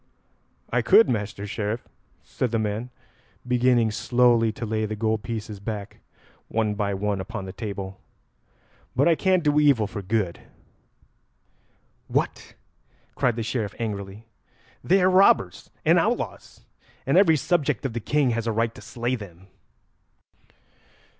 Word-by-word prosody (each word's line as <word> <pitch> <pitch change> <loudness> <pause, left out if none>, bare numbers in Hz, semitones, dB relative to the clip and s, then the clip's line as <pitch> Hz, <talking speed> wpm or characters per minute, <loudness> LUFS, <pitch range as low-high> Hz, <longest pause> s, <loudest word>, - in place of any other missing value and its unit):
"I - - +3
could, 225 - +6
Master 105 -3 -3
Sheriff," 105 +3 -3 0.4
said 125 - -2
the 115 - 0
man, 110 +3 -2 0.6
beginning 125 -2 +3
slowly 120 0 +3
to 115 - -5
lay 110 0 -1
the 110 - -4
gold 110 0 0
pieces 110 -2 -5
back 100 0 -6 0.5
one 110 -1 0
by 100 -1 -1
one 100 0 -1
upon 95 0 -6
the 95 - -7
table; 100 -2 -6 0.9
"but 135 +5 +3
I 170 - +6
can't 185 +1 +2
do 150 -1 +3
evil 140 -7 +4
for 100 0 -6
good." 100 -2 -1 1.7
"What?" - - -2 0.6
cried 125 -3 +1
the 115 - -3
Sheriff 110 -3 -3
angrily. 105 -1 -5 0.6
"They 190 +1 +3
are - - +5
robbers 185 - +3 0.2
and - - +5
outlaws, - - -3 0.4
and 135 - +1
every 175 -4 +6
subject 155 -1 0
of 130 - -2
the 120 - -2
King 140 +3 +1
has 115 0 -2
a - - +1
right 115 +1 0
to - - -13
slay 120 +1 -3
them." 95 -5 -8
115 Hz, 140 wpm, -25 LUFS, 105-125 Hz, 1.7 s, could